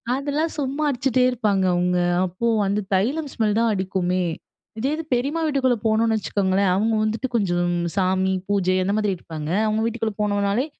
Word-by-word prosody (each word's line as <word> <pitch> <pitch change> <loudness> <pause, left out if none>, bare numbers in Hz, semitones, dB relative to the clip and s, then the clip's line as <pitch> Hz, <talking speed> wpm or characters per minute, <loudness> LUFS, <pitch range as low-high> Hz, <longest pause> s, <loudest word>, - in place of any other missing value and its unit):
அதெல்லாம் 290 +4 -1
சும்மா 280 +2 -2
அடிச்சிட்டே 255 -1 +1
இருப்பாங்க 210 -6 0
அவுங்க. 180 0 +1 0.3
அப்போ 185 +5 -4 0.2
அந்த 200 +2 0
தைலம் 275 +11 0
ஸ்மெல் 215 -2 0
தான் 230 -1 +2
அடிக்குமே! 185 -1 -1 0.6
இதே 265 +5 0
இது 325 - -5
பெரியம்மா 280 +7 0
வீட்டுக்குள்ள 265 -5 +1
போனோன்னு 220 0 +2
வச்சுக்கோங்களேன், 190 +1 +1
அவுங்க 220 +4 +1
வந்துட்டு 220 +4 -1
கொஞ்சம் 175 -5 +1 0.2
சாமி 190 0 +1 0.2
பூஜை 185 -2 +2
அந்த 200 +2 0
மாதிரி 210 -3 0
இருப்பாங்க. 155 -2 -7 0.2
அவுங்க 215 +1 0
வீட்டுக்குள்ளே 225 -2 -2
போனோனாலே, 205 +3 +1
210 Hz, 155 wpm, -22 LUFS, 190-250 Hz, 0.6 s, தான்